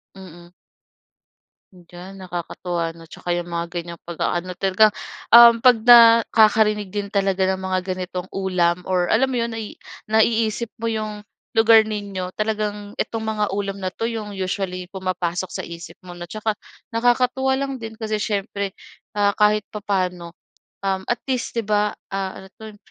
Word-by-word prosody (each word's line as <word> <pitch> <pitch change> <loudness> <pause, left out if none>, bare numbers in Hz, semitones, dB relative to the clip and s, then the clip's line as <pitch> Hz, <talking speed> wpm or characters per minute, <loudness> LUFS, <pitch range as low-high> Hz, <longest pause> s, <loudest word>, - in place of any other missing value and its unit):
Mm. 175 -2 -13 1.2
Diyan, 180 +1 -12
nakakatuwa, 175 -2 -4
'no? 165 - -13
Tsaka 170 - -10
yung 175 - -3
mga 170 0 -3
ganyang 170 -1 -7
pag-aano 175 +1 -3
talagang, 195 +3 +4 0.4
um, 235 0 +9
'pag 250 -1 +6
nakakarinig 220 -3 +6
din 200 0 -5
talaga 195 -1 +1
ng 190 0 -1
mga 190 0 -1
ganitong 180 0 -5
ulam, 180 -2 0
or 180 -1 +2
alam 245 +8 +2
mo 255 - -2
'yon, 235 -1 -1
nai 225 -2 -7 0.3
naiisip 220 +1 +1
mo 230 - 0
yung 215 -1 -4 0.3
lugar 225 0 +6
ninyo, 200 -4 -5
talagang 210 -1 -3
itong 225 - -2
mga 220 -1 -1
ulam 200 0 -3
na 185 -1 -4
'to 230 - -2
yung 215 -3 -5
usually 185 -1 -4
pumapasok 185 -1 -3
sa - - -3
isip 170 0 -9
mo, 180 -1 -11
'no? 175 - -7
Tsaka 215 +3 -3 0.3
nakakatuwa 250 +3 +2
lang 275 0 -2
din 225 -2 -8
kasi 220 -1 -3
siyempre, 200 -2 -3 0.4
ah, 205 -1 +1
kahit 210 0 +4
papaano, 185 -5 -3 0.5
um, 190 -1 0
at 240 - 0
least, 255 -3 -3
'di 230 - 0
ba, 210 0 0 0.2
ah, 190 -1 -4
ano - - -12
'to, 215 -1 -10
200 Hz, 155 wpm, -22 LUFS, 185-220 Hz, 1.2 s, um